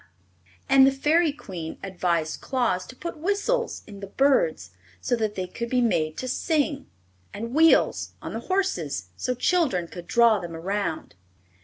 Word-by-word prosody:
And 270 0 +7
the - - +4
Fairy 305 +4 +2
Queen 180 - -7
advised 175 -4 -1
Claus 240 -9 -1
to 255 - -11
put 340 +2 -7
whistles 410 +7 -1
in 205 -2 -11
the 200 - -7
birds, 190 - +1 0.3
so 245 - 0
they 210 -5 -2
could 235 +6 -6
be 255 - +2
made 160 -10 +1
to 255 - -4
sing, 290 +1 0 0.5
and 230 +4 -5
wheels 320 +2 +4
on - - -7
the - - -3
horses, 175 - -2
so 250 - -2
children 255 - +1
could 175 0 -10
draw 235 -3 +4
them 170 -2 -7
around. 190 0 -3
230 Hz, 155 wpm, -25 LUFS, 180-285 Hz, 0.5 s, And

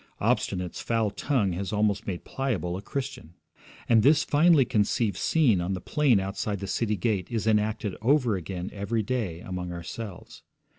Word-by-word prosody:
Obstinate's 90 -1 -1
foul 115 -3 0
tongue 115 -6 0
has 95 +2 -3
almost 105 -2 0
made 90 -3 -4
Pliable 115 -10 -2
a 95 - -5
Christian. 105 - -6 0.5
And 115 -2 +5
this 145 +6 +5
finely 150 -2 +4
conceived 105 -1 +1
scene 120 - +2
on 90 +3 -1
the - - -4
plain 135 -1 +2
outside 100 +1 -3
the 100 - -5
city 105 +2 0
gate 95 -1 0
is 115 -3 -2
enacted 105 -2 +1
over 125 -2 +3
again 90 0 -5
every 105 +2 -1
day 100 -8 -2
among 90 -1 -5
ourselves. 90 +4 -8
105 Hz, 160 wpm, -27 LUFS, 95-120 Hz, 0.5 s, And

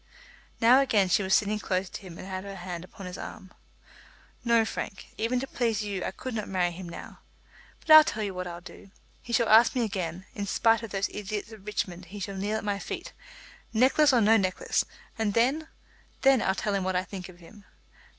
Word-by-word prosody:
Now 245 +3 +6
again 210 -8 +3
she 180 - +3
was 190 0 +3
sitting 210 +1 +1
close 185 -2 -1
to - - -8
him 180 -4 -10
and - - -9
had 190 -1 -4
her 200 0 -7
hand 175 -2 -6
upon 195 +1 -11
his 180 0 -7
arm. 190 - -9 0.9
"No, 235 -2 +4
Frank; 210 -2 -6
even 235 +3 0
to 265 - -3
please 230 -5 -1
you 200 -3 -3
I - - -1
could 255 +6 -7
not 215 -2 -3
marry 180 -2 +1
him 175 0 -8
now. - - -10 0.6
But 315 - -2
I'll 310 0 +12
tell 220 -6 -3
you 200 -2 -3
what 180 0 -4
I'll 175 0 -7
do. 195 - -13 0.3
He 240 - -9
shall 235 0 +3
ask 225 +4 +6
me 245 - +2
again. 185 -4 -3
In 205 -1 -4
spite 225 +2 +3
of 225 - -7
those 195 0 -1
idiots 210 +1 -5
at 220 -2 -11
Richmond 185 -3 -4
he 200 +4 -9
shall 195 +1 -4
kneel 205 +3 -1
at - - -5
my 200 -1 -1
feet, - - -6 0.6
necklace 270 +6 +5
or 245 -3 +4
no 220 +2 +6
necklace; 185 -3 0 0.3
and 210 -2 0
then, 270 +7 +2 0.6
then 270 -2 +5
I'll 190 - +1
tell 205 +1 -2
him 195 -1 0
what 185 0 -1
I 180 - +1
think 185 -1 -8
of 180 - -14
him. 200 +4 -16
205 Hz, 220 wpm, -28 LUFS, 185-225 Hz, 0.9 s, I'll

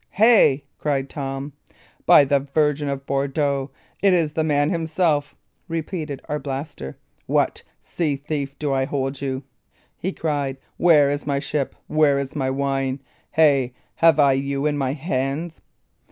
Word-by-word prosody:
"Hey!" 205 - +5 0.2
cried 140 -2 -1
Tom. 135 0 -5 0.5
"By - - +8
the 140 0 +2
Virgin 145 +1 0
of 135 0 -4
Bordeaux, 140 0 0 0.3
it 195 -2 +4
is 160 -4 +1
the 160 - 0
man 145 -1 +2
himself!" 160 -3 0 0.3
repeated 160 -4 -4
Arblaster. 145 - -5 0.3
"What, - - +1 0.2
sea 155 -5 -1
thief, 140 -1 -4
do 145 -2 -1
I 135 0 +1
hold 135 -1 -3
you?" 135 -1 -3 0.6
he 190 - -2
cried. 145 -6 -2 0.2
"Where 150 -5 +5
is 145 0 -4
my 140 -1 +1
ship? 140 0 -2
Where 155 -2 +3
is 140 -1 -4
my 135 -3 0
wine? 135 0 -1 0.3
Hey! 140 -5 +3 0.2
have 165 -1 +5
I 140 -2 +6
you 140 +1 -1
in 150 -1 +1
my 135 -2 -1
hands? 145 +2 -3
145 Hz, 145 wpm, -22 LUFS, 135-155 Hz, 0.6 s, By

